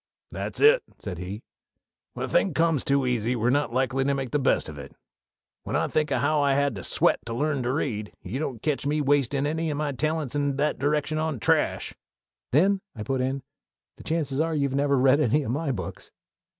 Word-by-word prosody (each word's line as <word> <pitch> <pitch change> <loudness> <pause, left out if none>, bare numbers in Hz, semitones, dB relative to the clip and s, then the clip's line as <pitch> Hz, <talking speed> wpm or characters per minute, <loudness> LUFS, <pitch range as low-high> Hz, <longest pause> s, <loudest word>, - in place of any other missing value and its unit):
"That's - - -5
it," 460 +3 +6 0.2
said 90 -4 -6
he. 95 +5 -6 0.7
"When - - -3
a - - -6
thing 185 - +1
comes 165 -4 +2
too 140 -1 +2
easy 120 -1 0
we're 120 +1 +1
not 145 -2 +1
likely 130 +1 +1
to 140 +1 +1
make 135 -3 -4
the 150 - +1
best 135 - +1
of 75 -2 -8
it. 70 0 -10 0.7
When - - -4
I - - +1
think 155 0 +1
of 140 - 0
how 150 +1 +2
I 140 -1 +3
had 140 -1 +2
to 95 - -7
sweat - - +2
to 115 - -3
learn 145 +1 0
to 125 +1 -1
read 110 -7 -2
you 110 +9 -4
don't 130 -7 -4
ketch 145 -2 0
me 150 +1 +1
wastin' 140 -1 +1
any 160 +1 -1
o' - - -2
my 150 0 -1
talents 155 0 -2
in 145 -1 0
that 150 +2 0
direction 150 +2 0
on 155 -5 -2
trash." - - +1 0.6
"Then," 190 +8 +3
I 105 - -5
put 135 +2 -1
in, 135 +1 -2 0.5
"the - - -12
chances 150 -4 -1
are 160 0 +1
you've 140 -2 0
never 140 0 +2
read 130 +2 +4
any 150 +1 +2
of 120 - -3
my 145 +2 -1
books." 125 - -6
140 Hz, 215 wpm, -26 LUFS, 130-150 Hz, 0.7 s, it